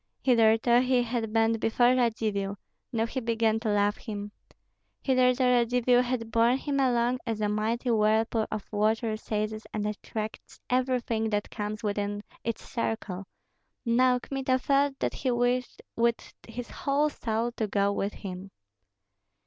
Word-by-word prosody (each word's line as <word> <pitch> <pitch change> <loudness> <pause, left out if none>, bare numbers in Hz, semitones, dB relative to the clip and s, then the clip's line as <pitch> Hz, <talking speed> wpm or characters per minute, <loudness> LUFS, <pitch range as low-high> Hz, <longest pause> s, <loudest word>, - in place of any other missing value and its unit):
Hitherto 230 -1 +4
he 250 -1 +2
had 230 -2 -2
bent 225 0 +2
before 240 +3 +3
Radzivill; 215 -5 0 0.3
now 225 -1 +1
he 245 +3 -3
began 225 -2 +1
to 220 -1 -2
love 205 0 +2
him. 205 -2 -6 0.7
Hitherto 255 -1 +3
Radzivill 245 0 +3
had 245 -2 -3
borne 230 +3 +4
him 280 0 -2
along 245 -1 +2
as 225 -2 -2
a 210 - +1
mighty 225 +4 0
whirlpool 220 +1 +2
of 215 -2 -5
water 215 +1 +1
seizes 215 0 -3
and 210 -1 -1
attracts 215 +1 -5
everything 250 -3 +1
that 205 -1 -2
comes 215 +1 -4
within 205 0 -2 0.2
its 230 -1 -4
circle; 215 -6 -3 0.6
now 250 +2 +4
Kmita 260 0 -1
felt 275 +1 +1
that - - -1
he 265 - -2
wished 245 +1 0
with 235 0 0
his 235 +1 -7
whole 290 +2 +1
soul 230 -1 -2
to 225 -2 -2
go 200 0 +1
with 200 +1 -2
him. 190 0 -7
230 Hz, 145 wpm, -28 LUFS, 215-250 Hz, 0.7 s, Hitherto